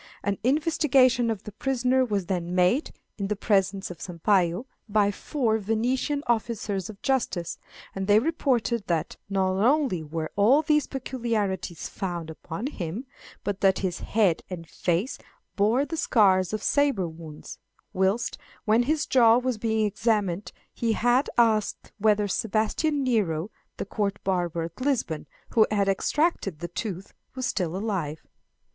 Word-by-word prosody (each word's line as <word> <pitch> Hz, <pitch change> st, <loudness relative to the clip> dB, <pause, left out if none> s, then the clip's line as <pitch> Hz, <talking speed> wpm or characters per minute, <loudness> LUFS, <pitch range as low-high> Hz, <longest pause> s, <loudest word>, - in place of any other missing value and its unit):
An 200 Hz, -1 st, -1 dB
investigation 265 Hz, -4 st, +3 dB
of 220 Hz, -4 st, -3 dB
the 210 Hz, -, -8 dB
prisoner 260 Hz, +2 st, +1 dB
was 205 Hz, -6 st, -1 dB
then 175 Hz, -1 st, -2 dB
made, 185 Hz, -, +3 dB, 0.3 s
in 200 Hz, -, -1 dB
the 210 Hz, -, -1 dB
presence 195 Hz, -2 st, +1 dB
of 175 Hz, -, -10 dB
Sampayo, 180 Hz, +3 st, +1 dB, 0.2 s
by 205 Hz, -1 st, +3 dB
four 225 Hz, -1 st, -1 dB
Venetian 245 Hz, +7 st, 0 dB
officers 220 Hz, -5 st, -1 dB
of 205 Hz, -2 st, -10 dB
justice; 230 Hz, -10 st, -1 dB, 0.3 s
and 195 Hz, 0 st, -3 dB
they 205 Hz, 0 st, +6 dB
reported 245 Hz, -, 0 dB
that 165 Hz, -3 st, -1 dB
not 190 Hz, 0 st, +1 dB
only 265 Hz, -, +2 dB
were 155 Hz, +1 st, -4 dB
all 245 Hz, +10 st, +5 dB
these 300 Hz, -2 st, +2 dB
peculiarities 220 Hz, -, -2 dB
found 175 Hz, -4 st, -4 dB
upon 165 Hz, +6 st, -6 dB
him, 210 Hz, -, -4 dB, 0.4 s
but 200 Hz, -1 st, -3 dB
that 195 Hz, -1 st, +4 dB
his 180 Hz, -1 st, -2 dB
head 200 Hz, -7 st, +2 dB
and 170 Hz, -3 st, -7 dB
face 175 Hz, +11 st, -1 dB, 0.4 s
bore 225 Hz, +7 st, +3 dB
the 325 Hz, -, -5 dB
scars 190 Hz, -, +3 dB
of 215 Hz, -1 st, -3 dB
sabre 280 Hz, -11 st, +2 dB
wounds; 160 Hz, -2 st, -10 dB, 0.3 s
whilst, 190 Hz, +5 st, 0 dB, 0.3 s
when 220 Hz, +1 st, +4 dB
his 305 Hz, +5 st, +1 dB
jaw 235 Hz, -3 st, +5 dB
was 250 Hz, -3 st, -1 dB
being 220 Hz, -1 st, +1 dB
examined, 205 Hz, -3 st, 0 dB, 0.2 s
he 230 Hz, -1 st, 0 dB
had 245 Hz, +4 st, +2 dB
asked 220 Hz, -3 st, +2 dB
whether 210 Hz, 0 st, +3 dB
Sebastian 225 Hz, +9 st, 0 dB
Nero, 205 Hz, -7 st, 0 dB, 0.3 s
the -, -, -3 dB
Court 200 Hz, 0 st, -2 dB
barber 175 Hz, -3 st, 0 dB
at 165 Hz, +9 st, -8 dB
Lisbon, 255 Hz, -, -1 dB, 0.2 s
who 220 Hz, -2 st, +4 dB
had 205 Hz, -2 st, +1 dB
extracted 195 Hz, -, 0 dB
the 175 Hz, +2 st, -6 dB
tooth, 195 Hz, 0 st, -5 dB, 0.2 s
was 255 Hz, -1 st, -2 dB
still 180 Hz, -6 st, -1 dB
alive. 185 Hz, -8 st, -3 dB
210 Hz, 145 wpm, -26 LUFS, 185-245 Hz, 0.4 s, they